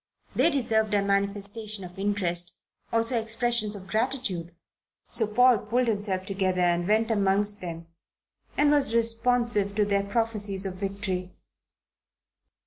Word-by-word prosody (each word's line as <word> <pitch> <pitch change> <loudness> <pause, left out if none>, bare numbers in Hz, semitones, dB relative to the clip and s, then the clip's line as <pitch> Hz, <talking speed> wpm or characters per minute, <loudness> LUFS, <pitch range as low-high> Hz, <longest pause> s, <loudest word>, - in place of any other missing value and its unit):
They - - +4
deserved 220 -7 0
a 200 - +2
manifestation 200 +1 -2
of 180 +1 -10
interest, 180 -4 -1 0.4
also 230 +1 +1
expressions 225 -1 +1
of 190 -2 -9
gratitude. 215 -6 -2 0.6
So 220 - +1
Paul 245 +1 +4
pulled 240 +5 0
himself 200 -4 -2
together 190 -2 -1
and 175 0 +1
went 220 +2 +2
amongst 205 0 +1
them 170 -2 -6 0.7
and 295 0 +4
was 280 -5 +2
responsive 230 -3 +2
to 210 -1 +2
their 200 -1 +1
prophecies 205 -2 +1
of 190 - -3
victory. 190 -1 -4
205 Hz, 130 wpm, -26 LUFS, 195-230 Hz, 0.7 s, They